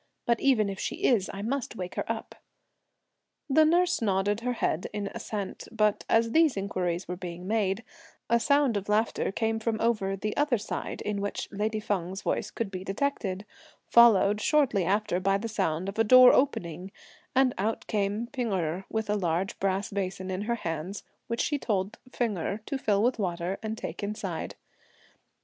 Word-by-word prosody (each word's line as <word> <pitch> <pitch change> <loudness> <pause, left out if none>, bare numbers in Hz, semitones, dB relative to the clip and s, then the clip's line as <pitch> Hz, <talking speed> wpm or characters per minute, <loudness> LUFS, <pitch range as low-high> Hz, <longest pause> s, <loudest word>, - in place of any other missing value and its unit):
But 235 -1 +2
if - - -5
even 215 -7 +3
she - - -4
is 220 -7 +3
I 200 - -6
must 260 +2 -2
wake 180 -3 -5
her - - -2
up." - - -5 1.1
The 310 +2 +5
nurse 350 +1 +3
nodded 205 0 +1
her 250 +1 -1
head 180 -7 -1
in 205 -1 -3
assent, 205 -3 -5
but 215 -2 +1
as 230 0 +3
these 315 -5 +4
inquiries 185 -2 -2
were 180 - -3
being 180 0 -7
made, 210 0 0 0.4
a 235 0 +3
sound 280 -3 +3
of 200 +1 -5
laughter 215 0 +1
came 225 +2 -1
from 225 0 -1
over 210 -4 +1
the 210 +2 -3
other 290 -4 +2
side, 210 - -5
in 205 -1 -2
which 205 - -3
lady 215 +2 -1
Feng's 190 -2 -3
voice - - -1
could 225 -4 -4
be 185 -1 -5
detected; 195 -2 -2 0.4
followed, 210 -3 +6
shortly 255 - +2
after, 195 -1 +1
by 195 +1 +2
the 220 +3 -4
sound 185 -5 -1
of 195 +3 -5
a - - +6
door 255 +3 +8
opening, 180 - 0 0.4
and 260 -1 +4
out 220 +3 -1
came 205 +2 -1
P'ing 245 -3 -3
Erh, 180 0 -1
with 220 -1 -2
a 210 - +1
large 180 -1 -1
brass 195 0 -1
basin 190 -1 -3
in 185 +1 -2
her 235 - +2
hands, 170 0 -4 0.2
which 230 0 -1
she 290 -2 0
told 200 -3 -2
Feng 225 -7 -1
Erh 200 +5 -2
to 275 - -3
fill 205 -4 +2
with 245 0 +1
water 180 -1 -2
and 220 0 -4
take - - -6
inside. 205 -4 -4
210 Hz, 180 wpm, -28 LUFS, 190-230 Hz, 1.1 s, door